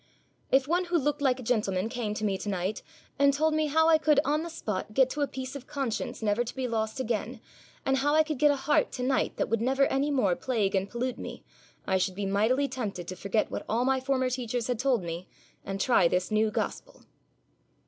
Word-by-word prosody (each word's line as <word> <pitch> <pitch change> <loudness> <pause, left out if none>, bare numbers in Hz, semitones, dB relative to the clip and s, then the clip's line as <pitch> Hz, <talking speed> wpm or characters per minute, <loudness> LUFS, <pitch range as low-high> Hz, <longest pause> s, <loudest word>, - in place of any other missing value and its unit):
'If 265 0 +4
one 350 +3 +1
who 345 0 +1
looked 295 -1 0
like 260 -2 +2
a - - -7
gentleman 210 -5 0
came 230 -3 -3
to 215 - -2
me 200 -2 +1
to 210 - -4
night 190 +2 -2 0.4
and 280 0 +6
told 310 +3 +1
me 310 0 +1
how 320 +2 +3
I 320 -1 +5
could 300 -2 +4
on 300 +2 +1
the 340 - -5
spot 215 - -4
get 260 -1 +4
to 295 - -3
a 285 - +2
peace 260 +1 -6
of 270 -2 -8
conscience 260 -5 -3
never 210 +2 +2
to 240 - -7
be 260 -1 -2
lost 220 +1 -2
again, 230 -4 -2 0.5
and 270 0 +2
how 290 +3 +2
I 315 - +6
could 310 -4 -4
get 295 - +5
a 285 - +3
heart 275 +2 +1
to 250 - -3
night 260 +1 0
that - - 0
would 230 -1 0
never 265 +3 +3
any 275 +2 0
more 250 -11 +2
plague 220 -5 -1
and 195 0 0
pollute 245 +1 -3
me, - - -7 0.4
I 190 0 +1
should 185 0 -1
be 200 +1 -3
mightily 220 +8 +2
tempted 210 -10 -5
to 185 - -5
forget 200 +4 -1
what - - -4
all 235 +3 +1
my 265 0 +2
former 260 -1 0
teachers 245 -2 -2
had 245 -2 -2
told 255 -6 +1
me, 170 +1 -5 0.4
and 195 0 -4
try 195 -5 +4
this 180 +4 -1
new 215 +1 +3
gospel.' - - -4
250 Hz, 235 wpm, -28 LUFS, 215-280 Hz, 0.5 s, and